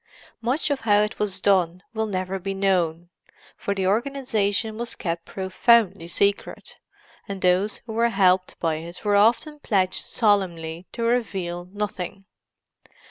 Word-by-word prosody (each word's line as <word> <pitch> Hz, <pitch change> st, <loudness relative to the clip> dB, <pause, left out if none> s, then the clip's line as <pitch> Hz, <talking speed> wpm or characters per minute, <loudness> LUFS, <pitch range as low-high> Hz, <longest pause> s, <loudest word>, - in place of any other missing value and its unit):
Much 265 Hz, +6 st, 0 dB
of 280 Hz, -, 0 dB
how 205 Hz, -3 st, +3 dB
it 210 Hz, 0 st, -2 dB
was 205 Hz, -3 st, -1 dB
done 180 Hz, -2 st, +2 dB
will 220 Hz, -1 st, -1 dB
never 190 Hz, -1 st, -2 dB
be 195 Hz, +1 st, -4 dB
known, 175 Hz, -3 st, 0 dB, 0.5 s
for 200 Hz, -, -3 dB
the 190 Hz, -1 st, -1 dB
organization 220 Hz, -2 st, 0 dB
was 235 Hz, +1 st, -5 dB
kept 170 Hz, -2 st, -3 dB
profoundly 190 Hz, -1 st, +2 dB
secret, 200 Hz, +4 st, -1 dB, 0.5 s
and 195 Hz, -1 st, -5 dB
those 185 Hz, +3 st, +2 dB
who 225 Hz, -, -6 dB
were 230 Hz, +1 st, +2 dB
helped 185 Hz, -4 st, +2 dB
by 160 Hz, -2 st, 0 dB
it 170 Hz, +5 st, -9 dB
were 205 Hz, -1 st, +3 dB
often 240 Hz, +9 st, +3 dB
pledged 190 Hz, -8 st, 0 dB
solemnly 180 Hz, -6 st, 0 dB
to 235 Hz, -, -4 dB
reveal 195 Hz, -7 st, -1 dB
nothing. 195 Hz, -1 st, -5 dB
195 Hz, 140 wpm, -24 LUFS, 180-220 Hz, 0.5 s, how